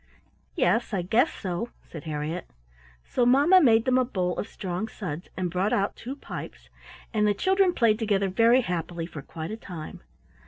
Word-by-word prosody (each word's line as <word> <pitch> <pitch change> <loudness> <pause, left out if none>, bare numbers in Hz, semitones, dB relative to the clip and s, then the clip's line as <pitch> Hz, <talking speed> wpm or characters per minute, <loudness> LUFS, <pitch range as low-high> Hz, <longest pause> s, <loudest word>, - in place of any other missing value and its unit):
"Yes, 235 - +1
I 180 - -1
guess 220 +8 +3
so," 185 +4 -4
said 160 -2 -10
Harriett. 155 +3 -4 0.6
So 250 - 0
mamma 285 +10 +6
made 230 -6 +5
them 255 0 +3
a - - +4
bowl 180 -8 -1
of - - -3
strong 185 +1 -4
suds, 180 -6 -6
and 180 -2 -1
brought 185 +4 0
out 200 0 0
two 255 +4 -6
pipes, 285 - -9 0.4
and 210 -1 +2
the 205 - +2
children 380 - +3
played 230 -8 +2
together 200 -3 +1
very 230 +6 +4
happily 175 -4 -3
for 155 -3 -8
quite 160 +4 -7
a 220 - -4
time. 170 -7 -8
205 Hz, 180 wpm, -26 LUFS, 175-240 Hz, 0.6 s, mamma